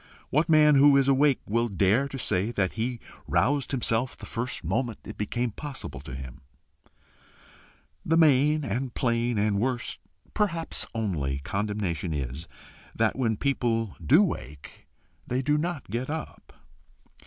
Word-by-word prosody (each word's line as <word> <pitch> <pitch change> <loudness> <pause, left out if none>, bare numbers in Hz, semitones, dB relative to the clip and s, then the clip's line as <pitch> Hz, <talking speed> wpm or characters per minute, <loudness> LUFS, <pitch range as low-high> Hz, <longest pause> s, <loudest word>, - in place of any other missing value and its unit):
What 155 +5 +2
man 155 -1 +6
who 140 0 +7
is 135 -1 +3
awake 140 0 +3
will 115 +3 +1
dare 105 +6 +2
to 140 - -7
say 100 -4 0
that 95 -4 0
he 120 +1 -2 0.3
roused 125 +12 +1
himself 125 -1 0
the - - -9
first 120 +2 -3
moment 120 -5 -1
it - - -8
became 120 +3 -2
possible 135 - -7
to 65 -2 -8
him? 65 +2 -9 1.6
The 165 - +2
main 150 -1 +4
and 125 +3 -3
plain 120 -1 0
and 100 -1 +1
worst, 120 +1 -2 0.3
perhaps 170 -6 -1
only 80 -12 -1
condemnation 100 -4 -2
is 70 +4 -5 0.5
that 110 -1 +1
when 115 -5 0
people 115 -6 0
do 160 +10 +6
wake 75 - -6 0.4
they 130 +2 -1
do 150 +3 +2
not 155 -1 -2
get 120 +4 -2
up. 155 +1 -6
120 Hz, 140 wpm, -27 LUFS, 100-140 Hz, 1.6 s, who